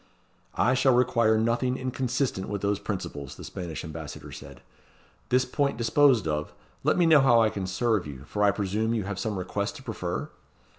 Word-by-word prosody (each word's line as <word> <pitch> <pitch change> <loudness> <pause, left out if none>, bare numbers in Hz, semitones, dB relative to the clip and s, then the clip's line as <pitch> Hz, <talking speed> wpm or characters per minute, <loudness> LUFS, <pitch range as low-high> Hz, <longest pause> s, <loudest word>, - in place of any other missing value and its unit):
"I 130 - +3
shall 130 -1 +4
require 115 -3 +3
nothing 120 +3 +1
inconsistent 130 -5 -2
with 100 -1 -4
those 100 0 +1
principles," 70 -9 -5
the - - -11
Spanish 85 -4 -6
Ambassador 80 -2 -8
said. - - -11 0.7
"This 130 +1 +3
point 140 0 -1
disposed 120 - +3
of, 75 -1 -3 0.3
let - - +2
me 175 - +4
know 160 -3 +6
how 120 -3 +5
I 110 -1 +3
can 100 -4 -4
serve 100 -1 0
you, 70 -2 -9
for 105 +7 -2
I 100 - +6
presume 105 +3 -1
you 110 - -1
have 100 0 -4
some 110 -3 -2
request 100 +2 -3
to - - -11
prefer?" - - -4
110 Hz, 185 wpm, -27 LUFS, 95-125 Hz, 0.7 s, know